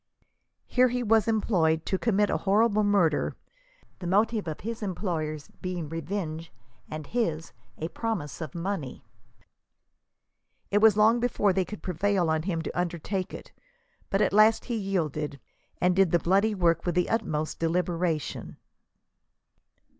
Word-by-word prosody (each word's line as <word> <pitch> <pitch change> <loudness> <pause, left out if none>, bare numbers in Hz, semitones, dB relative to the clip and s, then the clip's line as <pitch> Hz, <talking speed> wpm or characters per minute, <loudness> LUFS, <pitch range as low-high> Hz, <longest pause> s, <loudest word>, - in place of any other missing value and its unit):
Here 255 0 +3
he 250 0 -1
was 225 -1 +3
employed 175 -8 +1
to 190 - -1
commit 210 -3 +2
a - - +1
horrible 210 +2 +2
murder, 195 -7 +2 0.6
the 180 - -5
motive 210 +1 +1
of 155 - -5
his 230 +2 -5
employers 165 -7 -3
being 180 -4 -4
revenge, 165 0 -4 0.4
and 155 -1 -6
his, 165 -7 -2 0.2
a 160 - -3
promise 185 - -4
of 155 -2 -6
money. 170 -6 -4 1.7
It 205 - +4
was 215 -1 +6
long 220 +3 +5
before 220 -5 +1
they 190 0 +1
could 210 +4 -9
prevail 180 -1 +1
on 160 0 +1
him 165 -2 -2
to - - -4
undertake 180 +2 -2
it, - - -9 0.6
but 195 +2 +2
at - - +1
last 215 +2 +5
he 240 - -2
yielded, 155 -8 -2 0.4
and 180 0 +2
did 190 -2 +4
the 175 - +4
bloody 200 +6 +2
work 170 -3 +2
with 175 -1 -1
the 180 - +2
utmost 155 -9 -2
deliberation. 165 -1 -1
185 Hz, 145 wpm, -27 LUFS, 165-210 Hz, 1.7 s, was